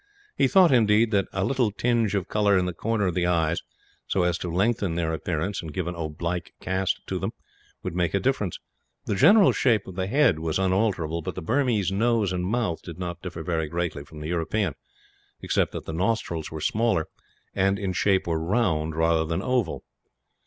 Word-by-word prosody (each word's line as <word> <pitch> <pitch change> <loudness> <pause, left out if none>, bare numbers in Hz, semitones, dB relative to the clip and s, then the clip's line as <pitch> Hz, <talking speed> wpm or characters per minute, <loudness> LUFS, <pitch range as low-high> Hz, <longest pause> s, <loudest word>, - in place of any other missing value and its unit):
He - - +3
thought, 190 -5 +5
indeed, 110 -2 +4
that 100 -2 +2
a 95 - -1
little 130 -4 +1
tinge 115 -1 0
of 95 -2 -1
colour 105 -2 +3
in 90 - +1
the 90 - -2
corner 110 +4 -1
of 90 - 0
the 90 0 +1
eyes, 85 -1 +1 0.5
so 95 - +1
as 90 0 0
to 90 - -4
lengthen 100 -1 +1
their 80 -1 -1
appearance 80 +5 -2
and 80 -3 -7
give 90 +3 -3
an 90 - -3
oblique 85 +2 -4
cast 95 0 -1
to - - -3
them, - - -3 0.5
would - - -3
make 90 0 0
a - - +3
difference. 115 -8 -1 0.5
The - - -1
general 200 - +6
shape 115 -6 +2
of 95 - -9
the 95 +1 -2
head 125 - +3
was 80 -1 -1
unalterable, 95 -4 0
but - - -5
the 95 - -5
Burmese 115 - +1
nose 110 -1 +1
and 90 0 -2
mouth 110 -6 -1
did 85 -2 -9
not 85 -1 -5
differ 85 -3 -6
very 80 -1 -1
greatly 85 -4 -3
from 75 +1 -12
the 75 - -5
European; 85 +1 -1 0.7
except - - 0
that - - -6
the 80 - -5
nostrils 85 -3 -1
were 80 -1 -6
smaller 110 -7 +1 0.5
and, 95 +1 +2
in 100 -3 -2
shape, 95 +1 +2
were 80 -1 -1
round 80 -6 0
rather 80 0 +2
than 80 +1 -2
oval. 125 -9 -1
95 Hz, 200 wpm, -25 LUFS, 85-105 Hz, 0.7 s, general